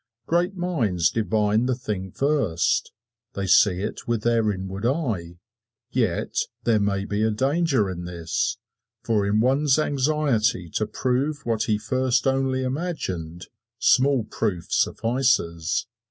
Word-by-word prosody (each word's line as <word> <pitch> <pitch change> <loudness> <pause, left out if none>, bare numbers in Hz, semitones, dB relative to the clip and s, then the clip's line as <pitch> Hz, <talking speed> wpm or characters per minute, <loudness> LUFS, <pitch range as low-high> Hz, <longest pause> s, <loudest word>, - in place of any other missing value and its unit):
Great 175 +3 +1
minds 120 - 0
divine 110 +1 +1
the 130 - +1
thing 105 -7 -4
first 125 - 0 0.4
they 100 - -2
see 95 0 +4
it 105 - -5
with 115 -2 -1
their 115 -2 +2
inward 95 +1 -5
eye. 115 - -1 0.5
Yet - - -1 0.3
there 115 -2 +3
may 100 -1 0
be 105 +2 0
danger 135 - +1
in 90 -2 -5
this, 85 -2 -2 0.5
for 105 -3 +1
in 105 +2 +2
one's 135 +3 +3
anxiety 135 - +1
to 110 - -1
prove 135 +6 -1
what 115 -2 0
he 110 -2 +1
first 125 +3 0
only 135 -1 +1
imagined, 95 - -4 0.3
small 135 -2 +3
proof 100 -6 -3
suffices. 115 -10 +1
115 Hz, 125 wpm, -24 LUFS, 100-135 Hz, 0.5 s, see